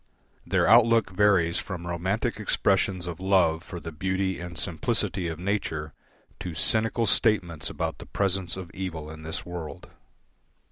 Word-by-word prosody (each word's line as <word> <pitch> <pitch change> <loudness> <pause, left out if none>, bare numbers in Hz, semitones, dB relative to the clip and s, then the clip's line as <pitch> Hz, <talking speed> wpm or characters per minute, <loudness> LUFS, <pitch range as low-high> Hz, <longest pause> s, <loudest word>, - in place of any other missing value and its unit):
Their - - +2
outlook 115 -1 +5
varies 95 -4 +3
from 90 -4 -6
Romantic 95 +7 -1
expressions 95 -3 +1
of 85 -1 -5
love 90 -4 +3
for 85 - -7
the 80 - -7
beauty 95 +3 -1
and 90 -1 -7
simplicity 95 +1 0
of 80 -1 -4
nature 85 -6 -2 0.5
to 90 -3 -5
cynical 115 +6 +2
statements 90 -8 +2
about - - -3
the - - -10
presence 95 -2 0
of 90 -2 -7
evil 80 -5 -5
in 80 0 -10
this 80 0 -5
world. 85 -3 -7
90 Hz, 145 wpm, -27 LUFS, 85-100 Hz, 0.5 s, outlook